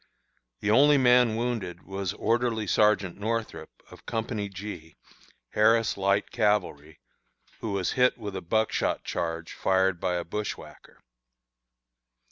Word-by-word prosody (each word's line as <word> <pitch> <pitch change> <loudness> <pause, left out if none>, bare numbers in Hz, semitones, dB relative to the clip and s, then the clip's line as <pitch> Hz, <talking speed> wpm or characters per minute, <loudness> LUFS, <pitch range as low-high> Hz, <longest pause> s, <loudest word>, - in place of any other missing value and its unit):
The 105 - +1
only 145 +5 +6
man 125 -3 +4
wounded 110 -7 -3
was 95 -1 -4
Orderly 115 0 0
Sergeant 100 -2 +2
Northrup, 115 +1 -3 0.2
of - - -15
Company 110 -3 -3
G, 95 -4 -8 0.5
Harris 110 +1 +3
Light 100 +1 0
Cavalry, 105 -9 -1 0.6
who 110 -3 -4
was 95 -2 -1
hit 125 -1 +2
with 105 -4 -6
a 95 - -4
buckshot 110 +5 0
charge 80 -1 -4
fired 95 -1 +1
by 90 - -1
a 90 - -2
bushwhacker. 105 +4 -7
105 Hz, 120 wpm, -27 LUFS, 95-115 Hz, 0.6 s, only